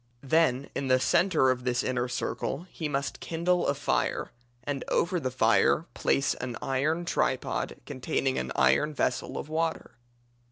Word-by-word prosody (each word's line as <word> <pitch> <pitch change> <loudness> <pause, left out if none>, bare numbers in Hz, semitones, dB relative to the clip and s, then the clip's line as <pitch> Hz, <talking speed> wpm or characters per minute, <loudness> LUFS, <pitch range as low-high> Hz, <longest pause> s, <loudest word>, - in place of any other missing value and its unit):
Then, 140 -2 +2
in 135 - -2
the 130 0 +4
centre 155 -3 +3
of 125 -1 -3
this 125 0 0
inner 125 -1 -1
circle 130 +5 -3
he 155 -3 -4
must 140 -1 -2
kindle 175 +2 0
a 140 - +1
fire, 140 - -1 0.3
and 140 0 -3
over 180 +1 +1
the 130 - -2
fire 130 - +3
place 135 0 +1
an 125 -2 -5
iron 155 +6 0
tripod - - -1
containing 65 0 -1
an 65 0 -4
iron 65 - +3
vessel - - -1
of - - -5
water. 160 +1 -2
135 Hz, 155 wpm, -28 LUFS, 125-160 Hz, 0.3 s, the